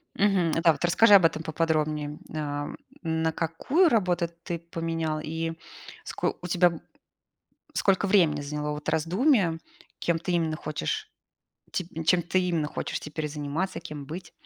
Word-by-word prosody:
Мгм, 195 Hz, -5 st, +3 dB
да, 165 Hz, +1 st, +4 dB
вот 150 Hz, +3 st, -1 dB
расскажи 205 Hz, +4 st, +7 dB
об 185 Hz, -4 st, +7 dB
этом 160 Hz, -1 st, +2 dB
поподробнее, 155 Hz, -2 st, -1 dB
ам, 145 Hz, -1 st, -3 dB, 0.2 s
на 160 Hz, -1 st, 0 dB
какую 175 Hz, -, +2 dB
работу 180 Hz, -7 st, +1 dB
ты 170 Hz, -1 st, -3 dB
поменял 165 Hz, -2 st, -3 dB
и 165 Hz, +1 st, -3 dB, 0.5 s
ско -, -, -2 dB
у 180 Hz, -, -5 dB
тебя 175 Hz, -2 st, +3 dB, 1.0 s
сколько 195 Hz, 0 st, +2 dB
времени 175 Hz, -7 st, +4 dB
заняло 150 Hz, +1 st, -3 dB
вот 150 Hz, 0 st, -6 dB
раздумие, 180 Hz, -, +2 dB, 0.4 s
кем 170 Hz, -1 st, 0 dB
ты 175 Hz, +2 st, -3 dB
именно 160 Hz, -2 st, +1 dB
хочешь, 430 Hz, -, -3 dB, 0.6 s
ти 185 Hz, -, -2 dB, 0.2 s
чем 175 Hz, +2 st, +4 dB
ты 180 Hz, +2 st, +1 dB
именно 170 Hz, -4 st, 0 dB
хочешь -, -, -4 dB
теперь 150 Hz, 0 st, -4 dB
заниматься, 150 Hz, +5 st, -3 dB
кем 150 Hz, -4 st, -8 dB
быть? 170 Hz, +2 st, -8 dB
165 Hz, 145 wpm, -27 LUFS, 155-180 Hz, 1.0 s, расскажи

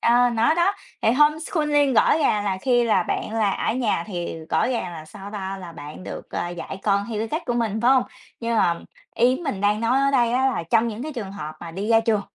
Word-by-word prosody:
Ờ, 245 Hz, +1 st, +4 dB
nó 230 Hz, +8 st, +3 dB
đó, 350 Hz, +4 st, +3 dB, 0.3 s
thì 220 Hz, -, +4 dB
homeschooling 300 Hz, -1 st, +2 dB
gõ 290 Hz, -, +5 dB
ràng 210 Hz, -8 st, +1 dB
là 190 Hz, -2 st, -1 dB
khi 245 Hz, -2 st, +3 dB
là 225 Hz, -, +3 dB
bạn -, -, -3 dB
là 215 Hz, -3 st, +2 dB
ở 220 Hz, -, -1 dB
nhà 220 Hz, -9 st, 0 dB
thì 175 Hz, -4 st, -4 dB
gõ -, -, +2 dB
ràng 230 Hz, -8 st, -2 dB
là 155 Hz, -2 st, -8 dB
sao 195 Hz, +5 st, -10 dB
ta? 195 Hz, -2 st, -5 dB
Là 175 Hz, -3 st, -9 dB
bạn 150 Hz, +3 st, -9 dB
được, -, -, -8 dB
à, 175 Hz, -, -2 dB
dạy 175 Hz, +2 st, -6 dB
con 200 Hz, -1 st, +2 dB
theo 215 Hz, -2 st, -3 dB
cái 225 Hz, +1 st, -2 dB
cách 315 Hz, +6 st, -2 dB
của 240 Hz, -, 0 dB
mình, 220 Hz, -2 st, -1 dB
phải 250 Hz, -, +5 dB
hông? 260 Hz, -2 st, +5 dB, 0.4 s
Nhưng 230 Hz, 0 st, -1 dB
mà 170 Hz, -5 st, +2 dB, 0.3 s
ý 250 Hz, +2 st, +3 dB
mình 205 Hz, -9 st, -3 dB
đang 205 Hz, +1 st, +2 dB
nói 245 Hz, +4 st, +2 dB
ở 275 Hz, 0 st, +3 dB
đây 240 Hz, -3 st, +2 dB
á 260 Hz, +2 st, +2 dB
là 255 Hz, -10 st, 0 dB
trong 230 Hz, 0 st, +3 dB
những 225 Hz, +3 st, -5 dB
cái 310 Hz, 0 st, -5 dB
trường 205 Hz, -6 st, -6 dB
hợp 155 Hz, -5 st, -6 dB
mà 170 Hz, -, -7 dB
đi 195 Hz, +6 st, -4 dB
ra 225 Hz, -1 st, +5 dB
trường, 225 Hz, -2 st, +1 dB
225 Hz, 255 wpm, -23 LUFS, 195-255 Hz, 0.4 s, gõ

